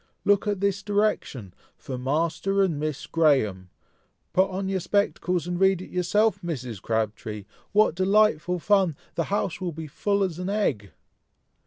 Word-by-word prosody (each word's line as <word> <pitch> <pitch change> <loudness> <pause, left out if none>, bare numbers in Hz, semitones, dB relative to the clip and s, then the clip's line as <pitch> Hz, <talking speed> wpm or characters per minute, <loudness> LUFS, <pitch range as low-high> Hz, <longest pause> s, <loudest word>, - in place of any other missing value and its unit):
"Look 205 +1 +3
at 205 -2 -1
this 200 -1 +1
direction! 200 - -1 0.2
For 130 - -6
Master 165 +9 0
and 165 -6 0
Miss 150 -1 -3
Graham! 110 - +1 0.6
put 190 +1 +3
on 190 +1 -3
your 190 0 0
spectacles, 180 -2 0
and 175 0 -3
read 190 -1 +4
it 185 - -10
yourself, 195 +3 +1
Mrs. 125 - -5
Crabtree! 110 -2 -3 0.3
What 210 -3 +4
delightful 185 -2 +2
fun! 190 -3 +2 0.2
the 165 - -1
house 190 -3 -2
will 175 -2 -3
be 160 +1 -6
as 150 - -13
full 200 +4 0
as 180 -3 -3
an 180 +1 -3
egg!" 135 - -1
180 Hz, 160 wpm, -25 LUFS, 145-195 Hz, 0.6 s, read